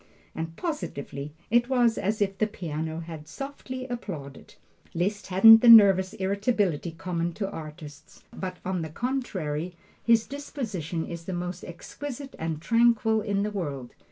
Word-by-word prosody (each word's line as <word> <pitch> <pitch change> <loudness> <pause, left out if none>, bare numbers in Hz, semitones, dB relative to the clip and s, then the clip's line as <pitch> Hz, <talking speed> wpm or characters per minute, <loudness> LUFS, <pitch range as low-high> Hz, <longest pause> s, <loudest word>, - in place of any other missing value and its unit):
and 165 0 -5
positively, 150 - -5 0.2
it 240 +1 +3
was 240 -3 +3
as 210 +1 0
if 195 -1 -3
the 215 - +3
piano 160 -4 -4
had 160 -2 -9
softly 260 - -7
applauded. 185 - -7 0.4
Liszt 200 +5 -1
hasn't 225 +4 +8
the 240 - +6
nervous 195 -4 +8
irritability 195 - 0
common 170 +1 -3
to 195 +3 -3
artists, 155 -3 -10
but 185 -1 -5
on 185 -1 -1
the 160 - -4
contrary 180 - -3 0.3
his 230 -1 +4
disposition 220 - -4
is 170 -1 -7
the 190 - -4
most 180 +1 -4
exquisite 270 - -8
and 160 -1 -3
tranquil 230 -1 +3
in 200 -1 -1
the 210 - -2
world. 145 -11 -5
190 Hz, 145 wpm, -27 LUFS, 165-230 Hz, 0.4 s, hasn't